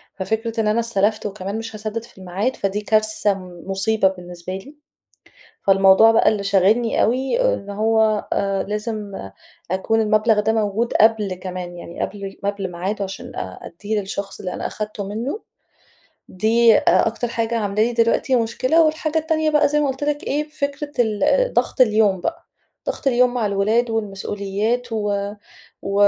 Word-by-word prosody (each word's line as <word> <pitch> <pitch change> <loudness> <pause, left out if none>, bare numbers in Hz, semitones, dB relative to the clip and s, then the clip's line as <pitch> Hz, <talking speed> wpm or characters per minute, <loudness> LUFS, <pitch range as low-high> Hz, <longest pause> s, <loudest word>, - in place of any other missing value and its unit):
ففكرة 220 +3 -2
إن 210 - 0
أنا 215 +2 +2
استلفت 215 -2 0
وكمان 200 0 -4
مش 225 0 -6
هاسدد 215 +1 -4
في 235 - -17
الميعاد 190 +7 -2
فدي 200 +1 -2
كارثة 215 -1 +1 0.3
مُصيبة 195 +1 +2
بالنسبة 180 -1 -6
لي، 260 +11 -8 0.9
فالموضوع 195 +3 +6
بقى 225 - +4
اللي 205 -2 -1
شاغلّني 200 +4 +2
أوي 265 - +1
إن 200 - -6
هو 220 +1 +1
آآ 195 -1 0
لازم 210 0 -4 0.6
أكون 220 +4 +1
المبلغ 215 0 +3
ده 220 +2 +1
موجود 220 +2 0
قبل 215 -3 +3
كمان 180 -1 -6
يعني 170 - -8
قبل 200 -1 -5
قبل 200 -2 -2
ميعاده، 195 +4 -3
عشان 195 0 -7
أ 95 - -6
أديه 205 +5 -4
للشخص 195 0 -5
اللي 180 - -4
أنا - - -3
أخدته 215 -1 -5
منُه، 235 - -4 0.9
دي 225 +3 +4
أ - - -2 0.3
أكتر 230 +2 -3
حاجة 230 0 -1
عاملة 205 0 0
لي 240 +2 +1
دلوقتي 230 +3 +2
مشكلة، 255 +8 +2
والحاجة 310 0 0
التانية 315 0 0
بقى 300 -1 +4
زي 300 +1 +1
ما 290 - +1
قُلت 265 +2 -3
لِك 295 0 -1
إيه 300 +2 -1
فكرة 290 -1 -4
ال 245 - +2
ضغط - - 0
اليوم 215 -5 +4
بقى، 330 - -4 0.4
ضغط - - -4
اليوم 250 -1 +3
مع 230 -4 0
الولاد 215 +4 +1
والمسؤوليات 210 +3 -2
و 205 -2 -1 0.5
و 195 - -3
215 Hz, 160 wpm, -21 LUFS, 200-235 Hz, 0.9 s, فالموضوع